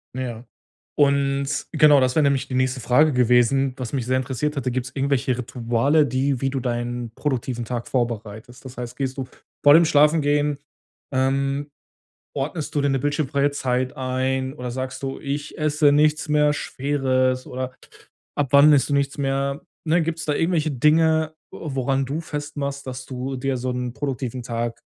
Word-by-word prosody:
Ja. 120 -2 -5 0.5
Und 140 -1 +1
genau, 150 -3 +6
das 130 0 +1
wär 155 - +4
nämlich 135 -1 +1
die - - -5
nächste 130 0 0
Frage 150 +6 +4
gewesen, 125 +2 +3
was 130 +1 -6
mich 130 -4 -1
sehr 130 +1 +1
interessiert 140 +3 -2
hatte. 130 -2 -1
Gibt's 130 +1 -3
irgendwelche 135 -2 0
Rituale, 125 +5 +1
die 130 +1 0
wie 135 - +1
du 135 - -2
deinen 120 -1 -3
produktiven 125 -4 -2
Tag 120 0 -4
vorbereitest? 115 -1 -4
Das 130 -1 -10
heißt, 125 0 -6
gehst 135 -1 -3
du 135 - -3 0.4
vor 145 0 +8
dem 165 +1 +7
Schlafengehen, 150 -1 +3 0.6
ähm 135 +2 0 0.7
ordnest 150 +3 -3
du 145 - +2
dir 140 - +2
'ne 135 - +1
bildschirmfreie 145 0 0
Zeit 130 -2 -1
ein 130 +1 -1
oder 125 -4 -5
sagst 130 +1 -5
du, 135 - -4
ich 145 +1 -4
esse 150 -1 +3
nichts 150 +1 +2
mehr 150 0 +3
Schweres 130 -3 0
oder 130 0 -5 0.6
ab 145 -3 0
wann 145 +2 +8
isst 140 - +3
du - - +2
nichts 140 +1 0
mehr, 140 +2 -1 0.2
ne? 165 +2 +3
Gibt's 160 0 -3
da 150 - +1
irgendwelche 160 -2 +1
Dinge, 160 +3 +3 0.2
woran 135 -3 -1
du 145 +5 -3
festmachst, 145 -3 -5
dass 130 0 -6
du 130 +1 -4
dir 135 +1 -1
so 125 +1 -3
'n 125 -1 -3
produktiven 130 -3 -4
Tag 115 -1 -3
135 Hz, 170 wpm, -23 LUFS, 125-145 Hz, 0.7 s, vor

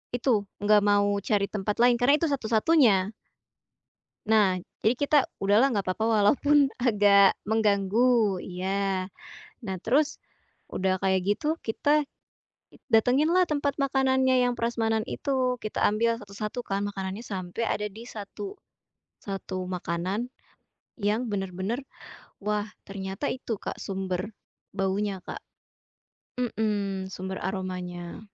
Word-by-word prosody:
itu, 230 -5 +1 0.2
nggak 210 0 +5
mau 205 0 +3
cari 200 0 0
tempat 210 0 -2
lain 240 0 +5
karena 260 +4 +5
itu 330 - +1
satu-satunya. 220 - +3 1.2
Nah, 210 -4 +5 0.3
jadi 225 - +5
kita, 285 +4 +1 0.3
udahlah 220 +7 +4
nggak 200 -2 -1
papa 185 +4 -1
walaupun 270 +6 +4
agak 205 -5 +5
mengganggu. 215 0 +2
Iya. 190 +1 -2 0.5
Nah, 190 -3 -3
terus, 295 - +1 0.5
udah 185 0 -1
kayak 190 -1 +2
gitu, 300 - 0
kita 290 +6 +2 0.7
i - - -16
datengin 250 +7 +4
lah 365 +1 +4
tempat 285 -3 -1
makanannya 265 -2 +2
yang 245 0 +2
prasmanan 225 -2 0
itu, 255 -2 -1
kita 215 - -1
ambil 230 +2 +2
satu-satu 210 +2 -6
kan 195 0 -1
makanannya 195 +1 -5
sampai 190 -3 -5
ada 210 - -1
di 215 +3 -11
satu 390 - -7 0.6
satu 190 -2 -5
makanan 185 +6 -3 0.7
yang 210 +4 +1
bener-bener, 195 +5 -3 0.6
wah, 210 0 -1 0.2
ternyata 195 +6 -4
itu, 250 -3 -4
Kak, - - -6
sumber 190 +1 -4 0.4
baunya, 195 0 -1
Kak. - - -7 1.0
Mhm, 205 -5 -1
sumber 190 0 -6
aromanya. 180 -2 -5
210 Hz, 120 wpm, -27 LUFS, 195-245 Hz, 1.2 s, nggak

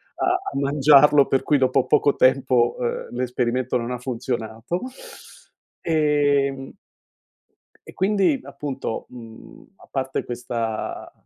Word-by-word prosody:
a - - -2 0.3
a - - -5
mangiarlo, 140 0 +5
per 135 - +1
cui 145 - +2
dopo 130 -1 +2
poco 145 -1 +2
tempo, 130 -2 +3
ehm, 120 -1 -3
l'esperimento 125 0 -1
non 120 0 -4
ha 125 - -4
funzionato, 120 +3 -4 1.0
ehm 145 -4 +1 1.2
e - - -11
quindi, 200 +7 +1
appunto, 135 -5 -5
mhmm, 115 - -13
a - - -19
parte 135 -1 -3
questa 115 -2 -4
130 Hz, 110 wpm, -22 LUFS, 120-145 Hz, 1.2 s, mangiarlo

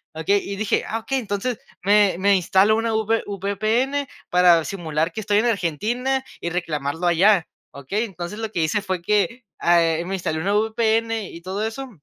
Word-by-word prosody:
¿okey?, 195 +6 +1
y 200 - -3
dije: 205 +1 0
"Ah, 225 - -2
okey, 265 +4 -2
entonces 220 +1 -3 0.2
me 205 -1 +4
me 200 +1 +4
instalo 190 +3 +3
una 225 0 -1
V 220 +1 +1
VPN 215 +8 -1 0.2
para 175 -2 +5
simular 165 -4 -2
que - - -5
estoy 205 0 +2
en 225 - +1
Argentina, 235 - -1 0.2
y 170 - -2
reclamarlo 160 -2 -3
allá, 180 +1 +4 0.2
¿okey? 165 - -3
Entonces, 190 0 -7
lo 220 -1 -3
que 175 - -1
hice 180 +7 0
fue 185 -3 -3
que, 210 +6 0 0.2
ah, 170 0 +4
eh, 165 +1 0
me 190 - -4
instalé 160 -4 -2
una 195 +5 0
VPN 220 +1 +1
y 170 - -10
todo 190 +4 -3
eso, 265 +4 -6
200 Hz, 185 wpm, -22 LUFS, 175-220 Hz, 0.2 s, para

